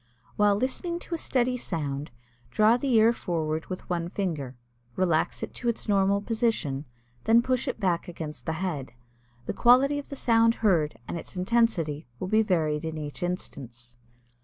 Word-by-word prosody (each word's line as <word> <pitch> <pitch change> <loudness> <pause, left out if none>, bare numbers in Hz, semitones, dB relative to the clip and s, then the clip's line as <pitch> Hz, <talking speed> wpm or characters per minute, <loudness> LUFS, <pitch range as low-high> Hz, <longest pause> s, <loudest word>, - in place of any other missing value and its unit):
While 205 -1 +4
listening 265 - -1
to - - -7
a - - 0
steady 250 -2 +1
sound, 150 - -3 0.4
draw 215 - +4
the 260 +2 -1
ear 225 +1 +6
forward 160 -6 -2
with 185 - -6
one 170 -2 -2
finger, 155 -10 -3 0.4
relax 170 -4 +1
it - - -5
to 240 - -2
its 230 - -3
normal 200 -1 +3
position, 215 - -1 0.4
then 230 +1 +5
push 255 0 0
it - - -3
back 180 -5 0
against 160 -3 -7
the 160 - 0
head. 160 -8 -3 0.5
The - - -2
quality 265 +4 +5
of 285 - -9
the 280 - -5
sound 230 -2 +4
heard 155 - +3
and 170 - -3
its - - -10
intensity 180 -7 +1
will 185 - -4
be 215 +2 +4
varied 160 -7 +1
in 160 -1 -4
each 150 +2 -6
instance. 120 -9 -5
185 Hz, 170 wpm, -27 LUFS, 155-230 Hz, 0.5 s, ear